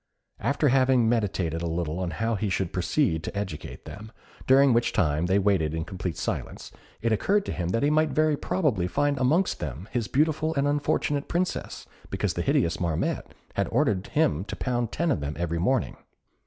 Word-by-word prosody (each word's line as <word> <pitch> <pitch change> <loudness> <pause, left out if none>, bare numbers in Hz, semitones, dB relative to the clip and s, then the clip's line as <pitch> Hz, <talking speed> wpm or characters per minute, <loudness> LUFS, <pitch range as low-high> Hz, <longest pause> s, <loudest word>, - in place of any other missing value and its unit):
After 140 +1 +1
having 130 -2 +4
meditated 95 -8 0
a 85 - -2
little 85 +1 -2
as 90 - -2
to 80 - -6
how 115 +4 0
he 105 -1 -1
should 95 -2 -1
proceed 90 - +1
to 100 - -5
educate 95 -7 -5
them, 110 +2 -9 0.4
during 135 0 +6
which 120 0 +2
time 80 -3 +1
they 95 +2 +3
waited 95 -6 +2
in 80 0 -3
complete 90 -3 -4
silence, - - -4 0.3
it 115 - +2
occurred 200 - +2
to - - -3
him 85 -2 -2
that 115 +8 0
he 145 - +3
might 155 0 +3
very 155 0 +2
probably 140 - 0
find 145 +5 0
amongst 155 +9 +2
them 75 - -5
his 120 -4 -1
beautiful 155 +2 +1
and 140 0 +2
unfortunate 145 0 0
Princess, 180 +1 -2 0.2
because - - -1
the - - -2
hideous 85 0 +1
Marmotte 85 -3 -1 0.2
had - - 0
ordered 95 -1 +1
him 95 - +1
to - - -5
pound 120 -3 -1
ten 170 0 0
of - - +1
them 70 +1 -4
every 85 -1 -1
morning. 125 +8 0
110 Hz, 195 wpm, -26 LUFS, 85-145 Hz, 0.4 s, during